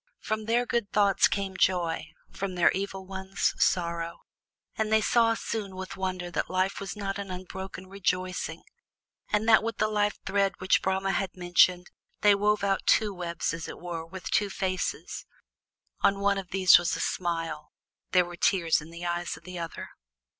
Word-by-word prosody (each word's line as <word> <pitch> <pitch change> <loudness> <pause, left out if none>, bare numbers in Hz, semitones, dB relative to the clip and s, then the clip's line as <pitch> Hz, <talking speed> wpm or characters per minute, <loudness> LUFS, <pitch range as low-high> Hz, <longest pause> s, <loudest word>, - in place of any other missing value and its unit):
From 215 0 -3
their 235 +2 +2
good 235 -4 -1
thoughts 200 -2 +4
came 195 -1 -3
joy, 175 -4 +1 0.2
from 195 -2 -4
their 175 -1 +5
evil 195 0 -4
ones, 190 +1 -1
sorrow; 170 -1 0 0.5
and 220 0 -1
they 220 - +5
saw 230 +1 +3
soon 205 -4 -4
with 190 0 -6
wonder 185 -2 -3
that - - -2
life 185 +1 0
was 200 +1 -5
not 200 -1 -3
an 200 -1 -5
unbroken 185 +1 -7
rejoicing, 185 -3 -2 0.7
but 210 +1 +2
that 225 -1 +6
with 225 0 -3
the 215 - +2
life 210 -1 0
thread 195 0 +1
which 185 +1 +3
Brahma 190 0 0
had 190 0 -2
mentioned 175 0 +3 0.3
they 205 -1 +6
wove 205 +1 +2
out 195 -1 0
two 210 -2 +4
webs 170 -3 -3
as 165 -1 -5
it - - -7
were 170 -2 -5
with 180 +3 -8
two 205 -1 +2
faces, 190 -1 -3 0.7
on 200 0 +3
one 200 0 +2
of 185 -2 -8
these 190 -1 +7
was 175 - -1
a - - -5
smile; 165 -4 -2 0.4
there 180 -1 +4
were 175 0 -8
tears 170 -3 +2
in 160 - -11
the 170 +1 -8
eyes 175 -1 -2
of 160 - -17
the 180 0 -7
other. 165 -1 -6
190 Hz, 180 wpm, -28 LUFS, 175-200 Hz, 0.7 s, these